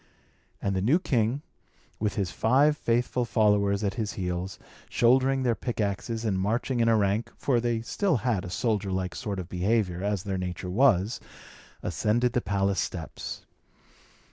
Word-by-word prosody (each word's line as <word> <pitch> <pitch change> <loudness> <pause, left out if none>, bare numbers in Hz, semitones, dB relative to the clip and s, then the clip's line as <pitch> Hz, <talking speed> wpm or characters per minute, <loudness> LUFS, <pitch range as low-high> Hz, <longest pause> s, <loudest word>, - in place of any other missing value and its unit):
And 100 -1 0
the 95 - 0
new 125 - +4
king, 130 -4 0 0.6
with 105 -1 -1
his 95 -4 -1
five 140 +6 +3
faithful 120 -1 0
followers 105 -3 +2
at 100 -1 0
his 105 - -3
heels, 90 0 -3 0.3
shouldering 130 +2 +3
their 120 -2 +2
pickaxes 115 0 -2
and 95 -4 0
marching 120 +6 0
in 115 - +3
a 115 -1 +5
rank 100 +2 0
(for 125 -4 +1
they 115 -1 0
still 185 - +1
had 110 -7 +1
a 90 - -6
soldier 105 -1 -1
like 95 -1 -2
sort 105 -4 -4
of 90 -3 -5
behaviour, 90 0 0
as 100 -3 -1
their 95 -2 -2
nature 90 0 -4
was), 110 -1 +3 0.6
ascended 110 +8 +1
the 125 - +1
palace 100 -2 0
steps. - - -5
105 Hz, 160 wpm, -27 LUFS, 95-120 Hz, 0.6 s, a